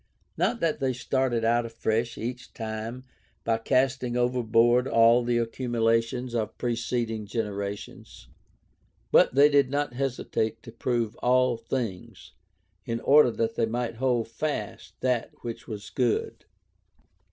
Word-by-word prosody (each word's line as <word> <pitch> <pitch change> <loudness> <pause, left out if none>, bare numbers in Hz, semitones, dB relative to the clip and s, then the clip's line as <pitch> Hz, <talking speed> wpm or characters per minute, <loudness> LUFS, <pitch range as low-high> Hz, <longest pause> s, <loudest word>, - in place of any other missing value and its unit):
Not 235 - 0
that 165 -3 0
they 135 -2 0
started 125 -2 0
out 120 +1 +3
afresh 115 0 -2
each 125 +2 -6
time 110 +2 -5 0.4
by 115 -1 +1
casting 130 0 +1
overboard 120 0 +3
all 115 +1 +5
the 120 0 +1
accumulations 115 0 0
of 110 -2 -2
preceding 115 -2 -2
generations, 100 - -5 0.8
but - - +5
they 140 +2 +7
did 140 -3 +3
not 145 -2 -1
hesitate 120 -4 -2
to 115 - -10
"prove 115 -1 -1
all 125 0 +3
things" 115 -5 -5 0.5
in 115 +1 -3
order 145 -2 +6
that 115 -1 -1
they 115 - 0
might 120 0 -3
"hold 125 -2 +1
fast 145 +6 -5
that 125 -2 0
which 115 0 -6
was 105 -2 -7
good." 125 -4 -1
120 Hz, 130 wpm, -27 LUFS, 115-125 Hz, 0.8 s, they